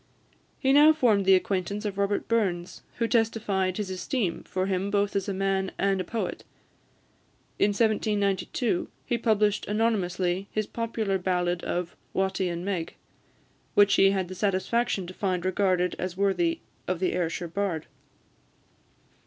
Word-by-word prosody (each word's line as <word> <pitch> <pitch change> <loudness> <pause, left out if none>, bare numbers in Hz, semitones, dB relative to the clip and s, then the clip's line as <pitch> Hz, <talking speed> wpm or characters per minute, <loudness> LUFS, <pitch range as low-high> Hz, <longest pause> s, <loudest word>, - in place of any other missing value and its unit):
He 270 -1 +2
now 300 +2 +8
formed 220 -9 +3
the 190 0 +7
acquaintance 195 +2 -1
of 205 -2 -2
Robert 200 0 0
Burns, 190 -7 -1
who 230 - 0
testified 215 -5 +1
his 205 -3 -3
esteem 185 +1 -2
for 185 0 -2
him 190 +1 -1
both 200 0 0
as 200 +1 -1
a - - 0
man 195 0 0
and 195 -1 +1
a - - -2
poet. 225 +5 -4 1.2
In - - +5
1792, 205 -1 0 0.2
he 240 - -1
published 210 -2 +2
anonymously 195 -4 0
his 215 0 -1
popular 220 -4 -2
ballad 180 -1 0
of 175 0 -3 0.2
"Watty 190 -1 0
and 170 +1 -4
Meg," 185 -5 -3 0.8
which 205 0 +6
he 195 - +6
had 190 -2 0
the 185 - -7
satisfaction 200 +2 0
to 180 - -8
find 185 -3 -1
regarded 185 -1 +1
as 185 -1 -4
worthy 265 - +1 0.3
of 185 -2 -1
the 185 - 0
Ayrshire 175 0 -2
Bard. 170 -2 -2
195 Hz, 145 wpm, -27 LUFS, 185-210 Hz, 1.2 s, now